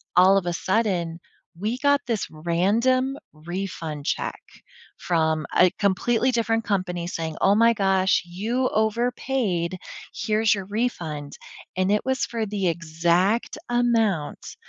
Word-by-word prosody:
all 185 +2 +6
of 195 - -1
a 175 - -1
sudden, 180 -4 0 0.4
we 215 +5 -1
got 285 0 +3
this 225 -4 -1
random 220 - +1 0.2
refund 165 -2 -5
check - - -2 0.6
from 160 -3 0
a 180 - +7
completely 225 +6 +1
different 225 -1 0
company 185 -5 -2
saying, 160 -2 -4
"Oh 195 +1 +5
my 230 +2 +5
gosh, 195 -2 +2
you 225 +9 -1
overpaid, 220 -5 0 0.4
here's 215 0 +2
your 195 -2 -5
refund." 170 -10 -3 0.4
And 185 +1 +1
it 210 - +1
was 260 -1 0
for 230 -2 -3
the 200 -3 -2
exact 170 +6 0
amount 225 -9 0
195 Hz, 125 wpm, -24 LUFS, 175-230 Hz, 0.6 s, a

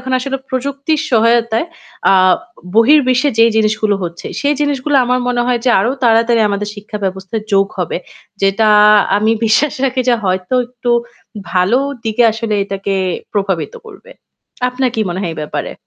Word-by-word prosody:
এখন 260 +1 -5
আসলে 270 +1 -3
প্রযুক্তির 275 +4 -2
সহায়তায় 230 +3 +2 0.4
আ - - +5 0.6
বহির্বিশ্বে 255 +2 +4
যেই 230 0 +5
জিনিসগুলো 215 -1 +1
হচ্ছে 170 0 -7
সেই 290 +1 +1
জিনিসগুলো 290 0 0
আমার 250 +1 0
মনে 245 -1 0
হয় 245 -2 0
যে 250 - +3
আরও 240 +6 0
তাড়াতাড়ি 230 0 +3
আমাদের 205 +1 -2
শিক্ষাব্যবস্থায় 205 0 -5
যোগ 195 0 +4
হবে। 180 - -2 0.5
যেটা 200 +3 +2 0.5
আমি 220 +2 +2
বিশ্বাস 260 +6 +2
রাখি 260 0 0
যে 240 - +5
হয়তো 185 +4 -1
একটু 245 -1 -4 0.6
ভালো 190 +7 +2 0.3
দিকে 220 +2 +1
আসলে 225 -1 -3
এটাকে 195 0 -3 0.4
প্রভাবিত 190 -7 -2
করবে। 430 +3 -14 0.6
আপনার 250 0 -1
কি 225 - -1
মনে 180 +2 -3
হয় 170 -4 -3
এই - - -10
ব্যাপারে? 150 - -4
230 Hz, 150 wpm, -15 LUFS, 200-255 Hz, 0.6 s, আ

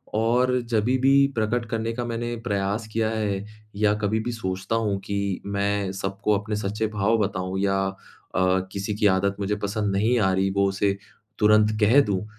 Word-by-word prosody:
और 125 +3 +2
जभी 115 +4 +2
भी 135 +2 +3 0.2
प्रकट 115 +2 0
करने 115 -1 -2
का 120 +1 -3
मैंने 120 0 -3
प्रयास 100 +2 -1
किया 110 -1 +1
है 105 -3 -2 0.3
या 105 0 +3
कभी 110 +2 +1
भी 120 - -2
सोचता 95 -2 -3
हूँ 100 -2 -1
कि 100 -2 -2
मैं 100 -1 -1
सबको 100 +2 -1
अपने 105 +1 -4
सच्चे 105 +2 -2
भाव 105 +3 +2
बताऊँ 95 -2 -2
या 95 0 +1
अ, 95 - -5 0.8
किसी 100 +2 -3
की 105 0 +3
आदत 100 +1 0
मुझे 100 +1 -1
पसंद 100 -1 -1
नहीं 115 +5 +2
आ 95 -2 +3
रही 95 +1 +1
वो 100 0 +3
उसे 100 0 0 0.4
तुरंत 105 0 +4
कह 115 +7 +6
दूँ 100 -5 -1
105 Hz, 180 wpm, -24 LUFS, 100-110 Hz, 0.8 s, कह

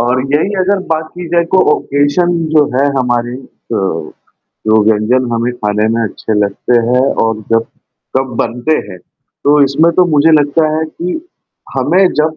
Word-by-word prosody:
और 125 +2 +1
यही 190 +7 +1
अगर 195 +2 +1
बात 160 0 -2
की 180 0 -7
जाए 170 0 +2
कोई 185 - +4
ओकेज़न 145 +5 +1 0.2
जो 150 -1 +5
है 140 - +3
हमारे 120 -1 -1
अ, 95 -9 -4 0.7
जो 110 0 +4
व्यंजन 110 +4 +2
हमें 115 +1 -1
खाने 105 -2 -1
में 115 - 0
अच्छे 110 0 -3
लगते 105 +4 +1
हैं 125 +1 +2 0.2
और 110 -1 -1
जब 115 0 +2 0.5
कब 130 -2 -2
बनते 125 +7 0
हैं। 90 -2 -9
तो 145 +10 -2
इसमें 155 +5 +2
तो 180 - +6
मुझे 150 +3 +4
लगता 150 +1 +3
है 160 - -1
कि 170 +3 -5 0.6
हमें 190 +1 +3
जब 155 +1 0
135 Hz, 165 wpm, -13 LUFS, 115-160 Hz, 0.7 s, तो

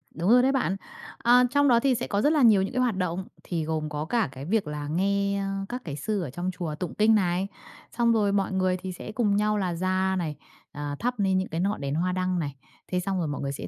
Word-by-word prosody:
Đúng 170 +4 0
rồi 245 +2 +7
đấy 265 - +4
bạn. 260 -8 0 0.4
À, 245 +1 +5
trong 285 +1 +4
đó 240 -3 +5
thì 260 +1 +2
sẽ 240 - -3
có 200 -1 0
rất 295 +6 +3
là 300 - +3
nhiều 220 -6 +6
những 195 - -2
cái 255 - +1
hoạt 245 -5 +1
động, 185 0 -2 0.2
thì 170 -3 -2
gồm 155 -1 -2
có 150 0 -3
cả 220 - 0
cái 135 +1 -8
việc 205 +1 0
là 150 -1 -4
nghe, 200 +4 0
ơ, 195 0 -3
các 250 +1 -4
cái 145 -4 -5
sư 200 +8 -2
ở 165 - -4
trong 175 +8 -3
chùa 170 -4 -4
tụng 175 +2 -5
kinh 220 +1 +4
này, 185 -1 +1 0.5
xong 235 -1 +4
rồi 210 -3 +2
mọi 200 -1 0
người 185 -1 +1
thì 185 +1 -6
sẽ 185 +4 -8
cùng 215 -2 +1
nhau 210 +1 +2
là 185 -3 -1
ra 185 +2 0
này, 155 -4 -3 0.4
à, 145 -1 -4
thắp 245 0 -2
nên 190 -2 +2
những 185 - -1
cái 165 - -3
ngọn 200 +1 -1
đèn 140 +1 -2
hoa 180 +3 0
đăng 185 0 0
này. 145 -4 -3 0.4
Thế 180 - +1
xong 190 +1 -2
rồi 165 - -1
mọi 145 - -4
người 140 -1 -2
sẽ 140 - -6
190 Hz, 270 wpm, -26 LUFS, 170-215 Hz, 0.5 s, rồi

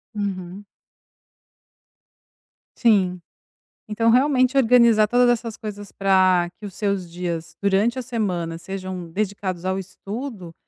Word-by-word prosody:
Uhum. 195 -1 -4 2.1
Sim. 190 -6 +2 0.7
Então 225 +2 +1
realmente 255 +1 +3
organizar 235 -4 +5
todas 245 +2 +4
essas 230 -2 -1
coisas 205 -2 -8
para 185 -3 +3
que 210 - -9
os 195 - -8
seus 200 -4 -2
dias 170 -1 -5
durante 205 +6 +2
a - - -2
semana 190 -9 -2
sejam 185 -1 -6
dedicados 190 -2 -3
ao 190 0 0
estudo, 195 0 -7
200 Hz, 110 wpm, -22 LUFS, 185-230 Hz, 2.1 s, organizar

